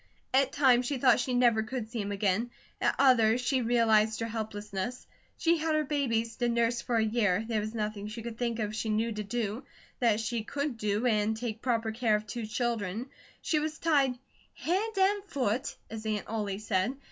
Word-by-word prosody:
At 270 0 +4
times 255 -4 +4
she 280 - -1
thought 255 0 +5
she 250 0 -1
never 240 -3 +4
could 220 0 -5
see 235 -3 -2
him 200 0 -4
again; 205 +3 0 0.3
at - - +2
others, 245 -4 +5
she 255 +1 +1
realized 220 -2 +3
her 230 - -1
helplessness. 210 0 -4 0.3
She 335 0 +3
had 315 0 0
her 310 - +2
babies 230 -6 -1
to 240 -1 +1
nurse 235 0 +1
for 240 - -2
a 225 - +3
year; 215 -2 +1
there 225 -2 0
was 215 +2 -5
nothing 210 -1 -3
she 215 +2 -7
could 235 -1 -7
think 235 -2 -1
of 215 -1 -2
she 220 0 -2
knew 220 +2 +1
to 210 -1 -3
do, 225 +2 -3 0.4
that 230 -4 +3
she 225 0 -2
could 280 +3 -3
do, 210 +2 0
and 220 -2 +2
take 225 -1 -4
proper 230 -3 0
care 220 -1 +2
of 210 0 -2
two 220 +1 -5
children. 230 0 -2 0.3
She 310 - +2
was 310 +1 -3
tied 280 -7 +2 0.4
"hand 395 +6 -1
and 390 +1 +3
foot," 260 - -1 0.2
as 220 -1 -6
Aunt 210 -1 -1
Ollie 210 -3 -2
said. 215 +4 -1
230 Hz, 200 wpm, -30 LUFS, 215-255 Hz, 0.4 s, thought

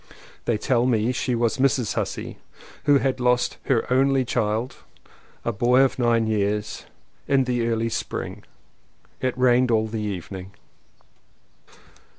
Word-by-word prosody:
They 120 - +1
tell 120 +2 +1
me 115 -1 +2
she 125 0 -1
was 120 +3 0
Mrs. 130 -4 +2
Hussey, - - -4 0.5
who 145 -1 +6
had 130 -1 0
lost 125 0 +1
her 120 -4 +1
only 135 0 +3
child 110 +3 -1 0.3
— - - -29
a 115 - +1
boy 120 +4 +3
of 135 -1 +1
nine 115 -2 +2
years 105 -1 -1 0.2
— - - -40
in 135 -1 +3
the 120 -2 -1
early 115 0 0
spring. - - -4 0.8
It 130 0 -1
rained 125 0 +4
all 110 -1 +2
the 110 0 -4
evening. 95 -1 -6
120 Hz, 145 wpm, -24 LUFS, 110-130 Hz, 0.8 s, who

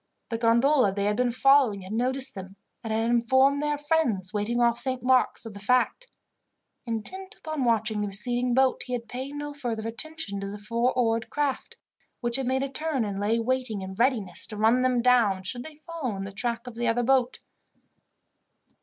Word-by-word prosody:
The 230 -2 -3
gondola 235 +1 +3
they 200 +1 -2
had 210 0 +1
been 250 -1 +1
following 255 -5 +4
had 190 +3 -7
noticed 260 +3 +1
them, 190 -1 -9 0.3
and 225 - -4
had 225 +1 0
informed 260 +4 +3
their 295 0 0
friends, 290 - 0
waiting 215 +3 -1
off 235 0 +2
Saint 255 -2 -2
Mark's, 255 -1 +2
of 225 - -8
the 200 - -9
fact. 250 - +1 0.8
Intent 375 - -5
upon 310 -4 -4
watching 220 -2 +1
the 205 - -1
receding 240 +5 +2
boat, 265 0 +3
he 250 - -4
had 235 -2 -4
paid 260 +5 -6
no 290 0 -5
further 235 -6 -4
attention 230 -3 -5
to 200 - -5
the 200 +1 -6
four 230 +4 0
oared 230 -2 +1
craft, 290 -3 -2 0.4
which 240 -1 +1
had 265 -2 -3
made 265 +1 +1
a - - -1
turn, 275 -3 -2
and 200 -1 -4
lay 210 +3 +1
waiting 230 -3 -1
in 190 0 -6
readiness 235 -2 +1
to 215 - -7
run 225 +4 +3
them 250 -2 +1
down, 225 -7 +3
should 245 +6 -4
they 315 +1 -10
follow 310 -7 -5
in 195 - -5
the 195 - -6
track 235 +3 -2
of 245 - -8
the 235 +1 -2
other 235 +1 +1
boat. 255 0 +2
240 Hz, 200 wpm, -26 LUFS, 220-265 Hz, 0.8 s, following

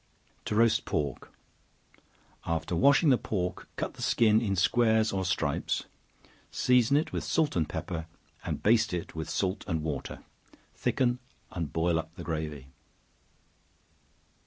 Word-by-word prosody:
To 105 - -2
Roast 115 0 +4
Pork. 70 -3 -3 1.1
After 85 +1 -2
washing 140 - +5
the 130 - +4
pork, 90 -3 -3
cut - - -3
the - - -11
skin 110 -1 +4
in 100 -4 0
squares 110 +3 +3
or 95 -1 0
stripes; 90 0 -1 0.7
season 125 +2 +3
it 155 - -1
with - - -2
salt 160 -3 +1
and 80 -3 0
pepper, 80 -2 -4 0.4
and - - -4
baste 110 -4 +3
it 85 - -5
with 80 0 -5
salt 95 +1 -1
and 80 -5 -1
water; 75 -4 -4 0.5
thicken, 125 -1 0 0.3
and 85 -5 -4
boil 80 +1 +1
up 80 +1 -8
the 85 - -8
gravy. 75 -5 -4
95 Hz, 135 wpm, -29 LUFS, 80-115 Hz, 1.1 s, washing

